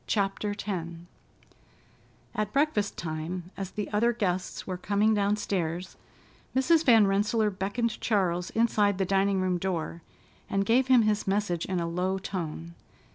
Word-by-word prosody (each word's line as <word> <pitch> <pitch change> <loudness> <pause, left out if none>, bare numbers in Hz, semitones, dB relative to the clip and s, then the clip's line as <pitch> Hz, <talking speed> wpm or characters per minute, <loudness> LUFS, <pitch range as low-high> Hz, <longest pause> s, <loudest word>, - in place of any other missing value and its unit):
CHAPTER 205 0 0
X - - -4 1.7
At 210 -1 -2
breakfast 275 -8 +1
time, 165 +3 -5
as 195 -2 -5
the 210 +1 -4
other 235 +3 +3
guests 185 -5 -2
were 185 - -3
coming 205 +4 +1
downstairs, 195 -4 -1 0.6
Mrs. 315 +5 +4
Van 225 -6 +6
Rensselaer 210 +2 +1
beckoned 205 +4 -2
Charles 180 -5 0
inside 210 -3 +2
the 190 - +1
dining 195 0 +2
room 185 -1 0
door, 170 -2 -3 0.5
and 195 0 0
gave 250 +5 +3
him 255 -3 +6
his 215 -1 0
message 195 -4 0
in 185 -1 -1
a 170 - -1
low 180 +3 -1
tone. 170 -3 -5
195 Hz, 140 wpm, -28 LUFS, 180-215 Hz, 1.7 s, Van